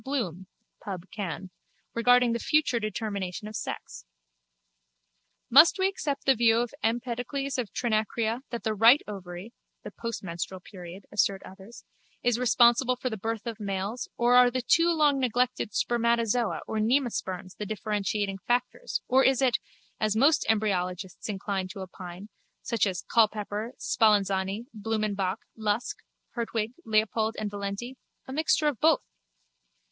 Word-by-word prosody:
Bloom 190 - -3 0.4
(Pubb. 190 -2 -7
Canv.) 190 -2 -5 0.4
regarding 245 0 +4
the 235 - -1
future 305 -4 +2
determination 210 -2 -4
of 215 - -8
sex. - - -6 1.4
Must 300 - +7
we 380 0 +3
accept 295 -7 -3
the 270 - +6
view 230 -2 +4
of 240 +1 -1
Empedocles 245 +4 -2
of 235 -5 -3
Trinacria 225 0 0
that 235 -1 -5
the 220 - 0
right 230 +6 +6
ovary 190 +1 -8 0.3
(the - - -7
postmenstrual 190 -5 -5
period, 180 0 -10
assert 200 -1 +1
others) 190 +5 -13 0.4
is 245 -1 +2
responsible 240 +1 +4
for 255 0 -3
the 220 - -3
birth 225 +2 -4
of 230 -2 -5
males 200 +3 -3
or 240 +1 +3
are 250 0 +7
the 255 0 -2
too 335 +7 +4
long 300 -4 +3
neglected 250 -3 0
spermatozoa 235 -1 +1
or 220 - -3
nemasperms 215 -6 -1
the 210 - -5
differentiating 205 -2 -2
factors 250 - -1
or 265 +1 +4
is 265 -1 +4
it, 255 -4 +2 0.4
as 215 -1 +1
most 280 +7 +4
embryologists 190 -3 -1
incline 195 -1 -2
to 195 +2 -9
opine, 185 0 -8 0.4
such 230 -4 +1
as 185 -2 -3
Culpepper, 215 0 +1
Spallanzani, 200 -1 +1
Blumenbach, 210 -2 -1
Lusk, 225 - -1 0.3
Hertwig, 230 -1 -2
Leopold 220 0 +1
and 210 -1 -3
Valenti, 205 +6 -5 0.3
a 265 - -6
mixture 310 +1 +2
of 280 -7 -1
both? - - +4
220 Hz, 140 wpm, -28 LUFS, 200-245 Hz, 1.4 s, Must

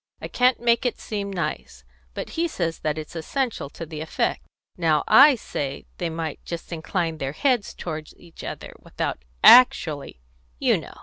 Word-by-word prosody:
I - - -6
can't 250 0 +2
make 235 0 +2
it 245 - -1
seem 200 -2 -4
nice. 155 - -4 0.3
But - - -5
he 335 +1 0
says 170 - -3
that 155 0 -2
it's 155 +2 -7
essential 225 - -2
to 165 - -8
the 155 -1 -7
effect. 160 - -1 0.3
Now 160 -4 +2
I 280 +1 +8
say 140 - -5
that - - -36
they 175 - -1
might 160 -2 -5
just 170 0 -7
incline 165 0 -2
their 135 -1 -3
heads 245 - 0
toward 155 -2 -6
each 170 -2 -14
other - - -7
without 65 - -4 0.2
actually, 155 - +6 0.4
you - - +3
know. - - -12
165 Hz, 175 wpm, -24 LUFS, 155-235 Hz, 0.4 s, I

